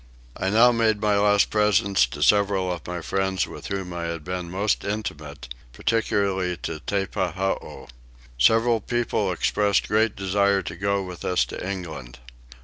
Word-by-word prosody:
I 95 Hz, -, -1 dB
now 115 Hz, +4 st, +6 dB
made 110 Hz, -3 st, +2 dB
my 105 Hz, -1 st, +2 dB
last 105 Hz, 0 st, +3 dB
presents 100 Hz, -8 st, +3 dB
to 70 Hz, +4 st, -4 dB
several 100 Hz, -2 st, +3 dB
of 85 Hz, -3 st, -6 dB
my 90 Hz, 0 st, -4 dB
friends 95 Hz, +1 st, -1 dB
with -, -, -9 dB
whom 95 Hz, -2 st, -4 dB
I 85 Hz, -1 st, -4 dB
had 85 Hz, -2 st, -4 dB
been 90 Hz, 0 st, -4 dB
most 100 Hz, +4 st, 0 dB
intimate, 75 Hz, -9 st, -5 dB, 0.3 s
particularly 100 Hz, -5 st, 0 dB
to 80 Hz, -1 st, -4 dB
Teppahoo. 95 Hz, +1 st, -2 dB, 0.5 s
Several 115 Hz, -, +4 dB
people 115 Hz, -4 st, -1 dB
expressed 100 Hz, +3 st, +1 dB
great 110 Hz, 0 st, +2 dB
desire 100 Hz, 0 st, +1 dB
to 85 Hz, -, -6 dB
go 100 Hz, +2 st, 0 dB
with 90 Hz, -2 st, -8 dB
us 90 Hz, -10 st, +1 dB
to -, -, -7 dB
England. 80 Hz, -10 st, -6 dB
95 Hz, 150 wpm, -24 LUFS, 90-105 Hz, 0.5 s, now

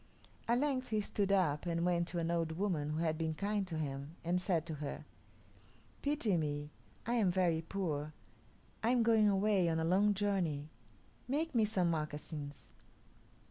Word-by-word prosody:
At 235 Hz, +1 st, +3 dB
length 265 Hz, -2 st, 0 dB
he 215 Hz, -2 st, +1 dB
stood 200 Hz, -1 st, 0 dB
up 175 Hz, -5 st, +2 dB
and 170 Hz, 0 st, 0 dB
went 170 Hz, -1 st, +2 dB
to 175 Hz, -, -4 dB
an 170 Hz, 0 st, 0 dB
old 165 Hz, -1 st, 0 dB
woman 165 Hz, -5 st, -1 dB
who 150 Hz, -, -2 dB
had 160 Hz, -1 st, 0 dB
been 160 Hz, -1 st, -1 dB
kind 200 Hz, +1 st, -1 dB
to 165 Hz, -3 st, -4 dB
him, 140 Hz, 0 st, -4 dB
and 175 Hz, +2 st, +1 dB
said 170 Hz, -4 st, +1 dB
to 165 Hz, -, -4 dB
her, 145 Hz, -, -5 dB, 1.0 s
"Pity 280 Hz, -, +1 dB
me. 150 Hz, -1 st, -2 dB, 0.3 s
I 235 Hz, -, 0 dB
am 220 Hz, -6 st, +3 dB
very 175 Hz, -3 st, +2 dB
poor. 160 Hz, -4 st, -3 dB, 0.7 s
I 225 Hz, -, +2 dB
am 245 Hz, -1 st, +4 dB
going 220 Hz, -2 st, +5 dB
away, 195 Hz, -3 st, +3 dB
on 160 Hz, 0 st, +1 dB
a -, -, 0 dB
long 200 Hz, +5 st, +3 dB
journey. 180 Hz, -8 st, 0 dB, 0.6 s
Make 310 Hz, +5 st, -1 dB
me 225 Hz, -3 st, +4 dB
some 185 Hz, -5 st, +1 dB
moccasins." 150 Hz, -3 st, -4 dB
175 Hz, 175 wpm, -35 LUFS, 160-205 Hz, 1.0 s, going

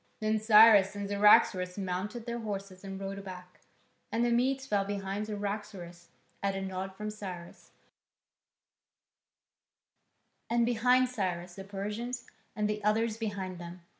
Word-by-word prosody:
Then 215 Hz, 0 st, +1 dB
Cyrus 215 Hz, -2 st, +7 dB
and 200 Hz, 0 st, -4 dB
Cyaxares 200 Hz, -2 st, +4 dB
mounted 200 Hz, +5 st, -3 dB
their 235 Hz, -1 st, -3 dB
horses 195 Hz, -3 st, -6 dB
and 195 Hz, -1 st, -6 dB
rode 195 Hz, 0 st, -5 dB
back, 180 Hz, -1 st, -10 dB, 0.5 s
and 230 Hz, +1 st, +1 dB
the 240 Hz, -, +1 dB
Medes 265 Hz, +3 st, +1 dB
fell 205 Hz, -7 st, +1 dB
in 195 Hz, -, -5 dB
behind 200 Hz, +1 st, -3 dB
Cyaxares, 200 Hz, -4 st, -5 dB, 0.3 s
at 195 Hz, -1 st, 0 dB
a 195 Hz, -, -3 dB
nod 190 Hz, 0 st, -5 dB
from 210 Hz, +1 st, -5 dB
Cyrus, 185 Hz, -5 st, -9 dB, 2.8 s
and 235 Hz, 0 st, +3 dB
behind 250 Hz, +2 st, +3 dB
Cyrus 180 Hz, -7 st, -3 dB
the 195 Hz, +1 st, -8 dB
Persians, 210 Hz, +5 st, -5 dB, 0.3 s
and 210 Hz, -1 st, 0 dB
the 210 Hz, 0 st, -3 dB
others 220 Hz, +1 st, +1 dB
behind 195 Hz, -5 st, -4 dB
them. 175 Hz, +1 st, -9 dB
205 Hz, 135 wpm, -30 LUFS, 190-220 Hz, 2.8 s, Cyrus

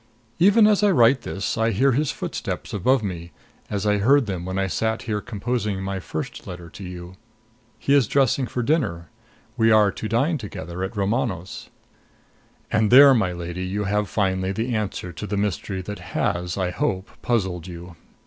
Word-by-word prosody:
Even 205 Hz, +5 st, +6 dB
as 210 Hz, -1 st, +4 dB
I 205 Hz, -, +4 dB
write 125 Hz, -6 st, +4 dB
this, 100 Hz, 0 st, -3 dB
I 115 Hz, 0 st, +3 dB
hear 130 Hz, +6 st, +3 dB
his 145 Hz, +3 st, +1 dB
footsteps -, -, -5 dB
above 120 Hz, +5 st, +2 dB
me, 85 Hz, -3 st, -5 dB, 0.4 s
as 100 Hz, -1 st, -2 dB
I 105 Hz, -1 st, +2 dB
heard 135 Hz, +6 st, +4 dB
them 95 Hz, -4 st, -4 dB
when 95 Hz, +1 st, -3 dB
I 95 Hz, -, +1 dB
sat 110 Hz, +4 st, -1 dB
here 105 Hz, -3 st, -2 dB
composing 105 Hz, -2 st, -2 dB
my 95 Hz, 0 st, -3 dB
first 90 Hz, -, -6 dB
letter 90 Hz, -2 st, -8 dB
to 100 Hz, -, -10 dB
you. 90 Hz, 0 st, -9 dB, 0.6 s
He 140 Hz, -, 0 dB
is 140 Hz, -6 st, +4 dB
dressing 135 Hz, 0 st, +2 dB
for 125 Hz, -, -3 dB
dinner. 105 Hz, -, 0 dB, 0.5 s
We 115 Hz, 0 st, +4 dB
are 105 Hz, -2 st, +5 dB
to 110 Hz, -, -6 dB
dine 140 Hz, +8 st, +1 dB
together 90 Hz, -5 st, -7 dB
at 95 Hz, +3 st, -5 dB
Romano's. 100 Hz, -, -2 dB, 1.0 s
And 110 Hz, 0 st, +2 dB
there, 140 Hz, +2 st, +9 dB
my 110 Hz, -7 st, +1 dB
lady, 85 Hz, +1 st, -5 dB
you 100 Hz, +3 st, -2 dB
have 105 Hz, +1 st, 0 dB
finally 95 Hz, -2 st, 0 dB
the 115 Hz, +5 st, -2 dB
answer 100 Hz, -4 st, -3 dB
to 105 Hz, -, -6 dB
the 105 Hz, -, -2 dB
mystery 95 Hz, -1 st, -2 dB
that 105 Hz, +2 st, -6 dB
has 90 Hz, +1 st, -2 dB
I 90 Hz, -2 st, -1 dB
hope 95 Hz, +2 st, -2 dB
puzzled 95 Hz, -7 st, -1 dB
you. 85 Hz, 0 st, -9 dB
105 Hz, 180 wpm, -23 LUFS, 95-120 Hz, 1.0 s, there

